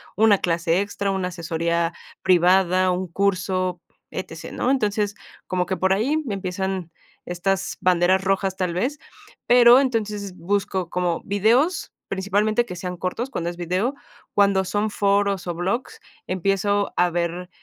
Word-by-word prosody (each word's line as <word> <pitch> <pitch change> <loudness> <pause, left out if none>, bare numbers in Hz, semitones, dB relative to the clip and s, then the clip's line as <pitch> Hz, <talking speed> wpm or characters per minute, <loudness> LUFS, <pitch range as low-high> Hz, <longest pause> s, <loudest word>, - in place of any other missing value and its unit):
una 215 -1 +5
clase 170 0 +1
extra, 200 0 -2
una 190 -1 -1
asesoría 170 -1 -1 0.3
privada, 185 +1 +4
un 180 +1 -2
curso, 185 -2 0 0.3
E-T-C, - - -7
¿no? 255 - 0
Entonces, 210 -5 0 0.3
como 180 -1 -1
que 190 - -2
por 190 0 +1
ahí 275 +11 +1
empiezan 190 -2 -3 0.4
estas 190 +2 -2
banderas 185 +1 +3
rojas, 195 0 0
tal 180 -3 -1
vez, 255 +12 -1 0.5
pero 245 +1 +7
entonces 210 -6 -2
busco 190 -1 -1
como 175 -2 -1
videos, 235 - +2 0.2
principalmente 205 +4 +1
que 180 - -7
sean 180 0 -5
cortos. 185 +9 -3
Cuando 170 -9 -3
es 175 - -12
video, 185 - -1 0.4
cuando 200 -2 +3
son 205 +3 -1
foros 200 -2 +1
o 175 - -2
blogs, 230 - -3 0.3
empiezo 195 +2 0
a 180 0 +4
ver, 175 +1 -2
190 Hz, 140 wpm, -23 LUFS, 180-205 Hz, 0.5 s, pero